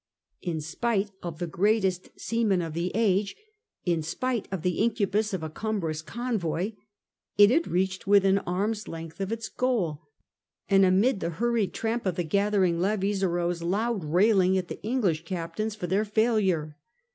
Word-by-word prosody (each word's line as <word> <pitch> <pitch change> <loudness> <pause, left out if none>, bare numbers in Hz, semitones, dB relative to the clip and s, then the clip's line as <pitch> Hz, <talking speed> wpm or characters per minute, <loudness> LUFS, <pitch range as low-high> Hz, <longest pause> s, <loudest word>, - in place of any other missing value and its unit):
In 165 -4 -3
spite 200 +6 -1
of 170 -3 -6
the 175 - -2
greatest 190 +1 0
sea 230 +1 -1
men 190 -5 +2
of 165 -2 -5
the 170 +3 -2
age, 205 -2 +2 0.5
in 170 -3 +1
spite 240 +8 -2
of 190 -4 -3
the 180 -2 0
incubus 215 -1 +1
of 190 -4 -3
a 160 - -3
cumbrous 170 -6 -2
convoy, 200 -1 -2 0.7
it 205 +1 +8
had 325 +6 +2
reached 190 +2 -1
within 195 -1 +5
arm's 205 +4 -2
length 165 +2 -7
of 195 +2 -2
its 225 0 -3
goal, 195 - -1 0.7
and 195 0 +5
amid 195 +5 +3
the - - -2
hurried 230 +3 0
tramp 230 -1 -1
of 180 - 0
the 175 - -1
gathering 190 0 +2
levies 200 +1 0
arose 175 -2 0
loud 205 +4 -1
railing 190 +3 +3
at 180 -2 -3
the - - -7
English 205 -9 0
captains 175 +5 -3
for 205 - -5
their 190 +4 +1
failure. 205 -8 +1
195 Hz, 165 wpm, -27 LUFS, 175-215 Hz, 0.7 s, it